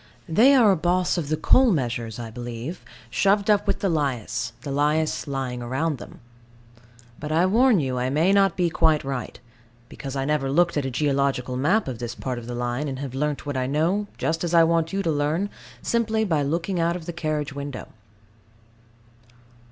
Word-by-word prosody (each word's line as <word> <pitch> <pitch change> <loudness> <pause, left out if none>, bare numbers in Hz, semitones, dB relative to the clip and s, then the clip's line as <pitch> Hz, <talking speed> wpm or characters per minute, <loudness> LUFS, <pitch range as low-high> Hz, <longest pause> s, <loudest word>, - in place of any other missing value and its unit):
They 240 - +5
are 230 -6 +6
a - - +3
boss 180 +2 +1
of 150 -4 -4
the 155 - 0
coal 260 +9 +5
measures, 120 - -1
I 115 -2 -6
believe, 120 +6 -6 0.3
shoved 200 - +3
up 205 0 +2
with 200 - 0
the 200 - +1
lias, 140 - -1
the 140 - -6
lias 150 +3 0
lying 135 -3 -3
round 130 +4 -2
them. - - -12 1.0
But 150 +1 -5
I 165 +3 +3
warn 230 +2 +4
you 130 -3 -1
I 125 +1 0
may 160 +8 +2
not 195 -1 +3
be 175 -2 +1
quite 160 -2 +2
right: 135 -2 -5 0.5
because 135 -1 -7
I 135 -1 -1
never 145 -2 0
looked 170 +4 +2
at 145 -3 0
a - - -2
geological 135 -2 0
map 170 +11 +1
of 125 -4 -5
this 120 0 -5
part 125 -2 -4
of 115 - -10
the 120 - -5
line, 120 +4 -2
and 135 -2 -4
have 135 -2 -6
learnt 150 +2 -2
what 145 -1 -3
I 130 -1 -1
know, 170 +9 0
just 165 +1 -1
as 170 0 0
I 165 - +7
want 165 0 +1
you 195 0 -1
to 165 - +1
learn 155 +7 0 0.3
simply 220 -1 +1
by 160 -7 +1
looking 165 +6 -1
out 170 +1 +1
of 175 -3 -7
the 175 - -5
carriage 155 -4 -2
window. 140 -2 -6
150 Hz, 200 wpm, -24 LUFS, 135-175 Hz, 1.0 s, I